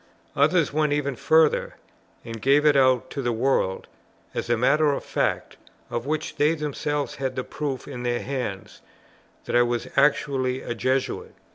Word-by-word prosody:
Others 155 +2 +3
went 150 -1 +1
even 140 -2 -1
further, 160 +4 +2 0.5
and 115 -1 -7
gave 140 +3 +4
it 150 -1 +5
out 130 -1 +3
to 140 - -3
the 120 -2 0
world, 115 -5 0 0.5
as - - -4
a 120 - +2
matter 150 +5 +3
of - - -4
fact, - - -2 0.3
of 120 +3 -3
which 155 +1 -3
they 150 +3 +3
themselves 150 -1 -3
had 135 -2 -3
the 130 - -2
proof 140 -2 -5
in 125 -4 -7
their 120 -1 -1
hands, 125 -8 -5 0.6
that - - -2
I 120 - +6
was 120 -1 -1
actually 135 -2 +1
a - - -3
Jesuit. 130 +3 -2
135 Hz, 165 wpm, -24 LUFS, 125-150 Hz, 0.6 s, I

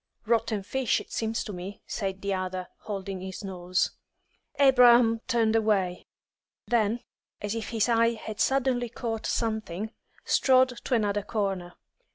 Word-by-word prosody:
"Rotten 225 -2 +1
fish, 265 +5 0
it - - -11
seems 225 0 -1
to 210 - -6
me," 185 +3 -8
said 195 -3 -4
the 200 0 0
other, 185 -1 -3 0.2
holding 195 -2 -4
his 190 +2 -7
nose. 185 -1 -1 0.7
Abraham 245 -4 +6
turned 230 -3 +2
away; 200 -5 +1 0.6
then, 230 0 +1 0.4
as 205 0 -3
if 225 -2 -4
his 225 -1 +1
eye 230 0 +3
had 220 -1 -7
suddenly 255 -2 +1
caught 225 -1 -4
something, 220 -3 -2 0.3
strode 260 -1 +4 0.2
to 255 - +1
another 205 -2 +1
corner. 195 -4 -2
220 Hz, 140 wpm, -27 LUFS, 195-235 Hz, 0.7 s, Abraham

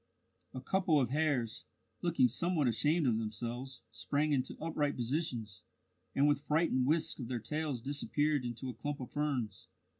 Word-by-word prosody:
A 130 - -4
couple 180 0 +2
of 125 -3 +1
hares, 140 -7 0 0.4
looking 170 -7 +4
somewhat 155 +4 +1
ashamed 150 +7 +2
of 115 -3 +3
themselves, 120 +3 -4
sprang 145 +7 0
into 130 -3 0
upright 150 -2 0
positions, 120 - -2 0.5
and 140 +2 +4
with 145 -1 +3
frightened 150 -5 +2
whisks 160 +1 +2
of 125 - -4
their 125 0 -2
tails 140 +2 -2
disappeared 145 +1 +1
into 120 +2 -4
a 125 - -3
clump 140 +6 -4
of 125 - -7
ferns. 135 -8 -2
140 Hz, 155 wpm, -34 LUFS, 120-150 Hz, 0.5 s, looking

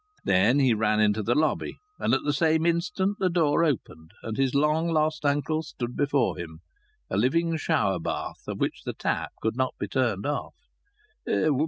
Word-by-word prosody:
Then 100 +8 +3
he 130 -4 +4
ran 110 0 +1
into 105 0 +3
the 120 +4 +1
lobby, 155 +1 0 0.2
and - - +2
at - - -2
the 145 - 0
same 160 +1 +2
instant 185 +4 0
the 185 - +2
door 165 -2 +2
opened 90 - -2
and 110 -1 -4
his 135 +1 0
long 150 +3 +2
lost 155 -1 +1
uncle 145 +2 +1
stood 125 -6 -6
before 140 -2 +1
him, 80 -1 -8 0.5
a - - 0
living 165 +9 +2
shower 100 - +1
bath, 80 - -5
of - - -4
which - - -1
the - - -4
tap - - -2
could 110 0 0
not 130 0 -1
be - - -3
turned 115 -7 0
off. 145 0 -3
140 Hz, 180 wpm, -26 LUFS, 110-155 Hz, 0.5 s, he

